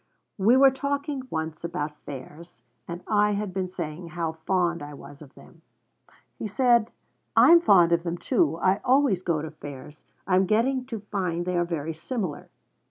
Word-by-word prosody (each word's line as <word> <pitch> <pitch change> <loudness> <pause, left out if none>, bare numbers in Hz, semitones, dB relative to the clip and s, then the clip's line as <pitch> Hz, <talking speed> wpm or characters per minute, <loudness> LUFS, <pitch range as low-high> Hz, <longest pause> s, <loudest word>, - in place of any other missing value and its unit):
We 225 +7 +5
were 270 0 +7
talking 280 0 -3
once 160 -2 -4
about 150 -3 -4
fairs, 145 0 -10 0.2
and 175 +1 -7
I 210 -1 +3
had 200 -2 -3
been 185 -1 -2
saying 170 -1 -6
how 165 -1 -3
fond 170 +1 -1
I 145 0 -8
was 140 +1 -13
of 140 -3 -14
them. - - -17 0.8
He 220 - -3
said: 235 0 +3 0.5
'I - - +7
am 340 0 +8
fond 180 - +5
of 170 0 +3
them, 170 0 -3
too. 160 -2 +1
I 185 +3 +2
always 260 -7 +3
go 165 -4 -1
to 160 - -6
fairs. 145 0 -10 0.2
I 185 -1 +2
am 190 0 +3
getting 250 +5 +1
to 225 -5 -5
find 175 -4 -1
they 180 0 -2
are 175 0 +1
very 165 -2 -3
similar.' 175 - -5
180 Hz, 180 wpm, -26 LUFS, 160-215 Hz, 0.8 s, am